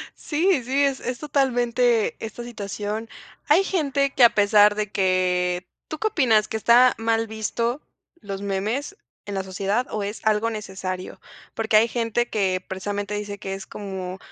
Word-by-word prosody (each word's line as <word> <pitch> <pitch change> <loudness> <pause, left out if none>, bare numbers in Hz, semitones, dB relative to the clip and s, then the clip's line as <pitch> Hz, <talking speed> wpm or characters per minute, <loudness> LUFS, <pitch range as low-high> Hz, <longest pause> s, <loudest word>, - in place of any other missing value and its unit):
Sí, 325 -2 +1
sí, 270 +4 +1
es 275 -1 +1
es 250 0 -4
totalmente 245 -5 +1
esta 225 +2 -6
situación. 215 -1 -5 0.4
Hay 330 +6 +5
gente 280 -7 0
que 255 - +4
a 235 - +10
pesar 205 0 +5
de 210 -1 -3
que 180 -2 +1 0.2
¿Tú 310 - -5
qué 440 - +1
opinas? 235 - +3
¿Que - - -5
está 240 +3 +5
mal 225 0 0
visto 230 +4 -2 0.4
los 195 -2 -6
memes 210 - -2 0.3
en 205 - -6
la 190 - -1
sociedad? 200 +6 -1
O, 210 -2 -2
¿es 205 +2 -5
algo 215 +1 +2
necesario? 190 -4 -6 0.3
Porque 225 0 0
hay 225 +2 +6
gente 235 +1 -1
que 190 -3 0
precisamente 200 +2 -4
dice 205 -1 -5
que 195 - -5
es 195 - -8
como, 190 -2 -6
220 Hz, 165 wpm, -23 LUFS, 200-245 Hz, 0.4 s, a